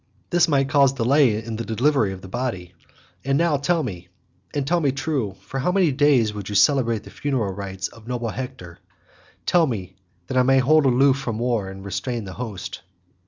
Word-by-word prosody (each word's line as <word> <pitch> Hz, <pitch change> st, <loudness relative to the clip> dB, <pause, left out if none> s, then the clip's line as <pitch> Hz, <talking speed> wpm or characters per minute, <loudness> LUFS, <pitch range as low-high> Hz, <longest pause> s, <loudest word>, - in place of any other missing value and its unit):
This 175 Hz, 0 st, +4 dB
might 140 Hz, -3 st, +2 dB
cause 140 Hz, -2 st, +4 dB
delay 125 Hz, -3 st, +3 dB
in 110 Hz, -1 st, -5 dB
the 115 Hz, -, -3 dB
delivery 115 Hz, -1 st, +1 dB
of 95 Hz, -1 st, -8 dB
the 95 Hz, -, -10 dB
body. 95 Hz, -5 st, -4 dB, 0.5 s
And 135 Hz, +1 st, +1 dB
now 165 Hz, -2 st, +2 dB
tell 160 Hz, +4 st, +1 dB
me 90 Hz, -8 st, -6 dB, 0.4 s
and 145 Hz, -2 st, -2 dB
tell 175 Hz, +5 st, +2 dB
me 145 Hz, -4 st, +1 dB
true, 135 Hz, -7 st, -2 dB
for 135 Hz, -, -5 dB
how 155 Hz, +8 st, +1 dB
many 180 Hz, -4 st, +3 dB
days 130 Hz, -6 st, +3 dB
would 105 Hz, -2 st, -6 dB
you 105 Hz, -, -4 dB
celebrate 115 Hz, 0 st, +3 dB
the -, -, -12 dB
funeral 125 Hz, -9 st, -2 dB
rites 95 Hz, -1 st, -5 dB
of 115 Hz, -1 st, -16 dB
noble 120 Hz, -2 st, -2 dB
Hector? 125 Hz, -9 st, -7 dB, 0.7 s
Tell 170 Hz, -2 st, +3 dB
me, 95 Hz, -7 st, -5 dB, 0.3 s
that 130 Hz, -, -3 dB
I -, -, +6 dB
may 135 Hz, +1 st, +4 dB
hold 140 Hz, +3 st, +4 dB
aloof 135 Hz, +2 st, +4 dB
from 115 Hz, -5 st, -3 dB
war 115 Hz, -4 st, -1 dB
and 95 Hz, 0 st, -10 dB
restrain 120 Hz, +3 st, -3 dB
the 95 Hz, -2 st, -8 dB
host." 110 Hz, -5 st, -6 dB
125 Hz, 200 wpm, -23 LUFS, 105-140 Hz, 0.7 s, I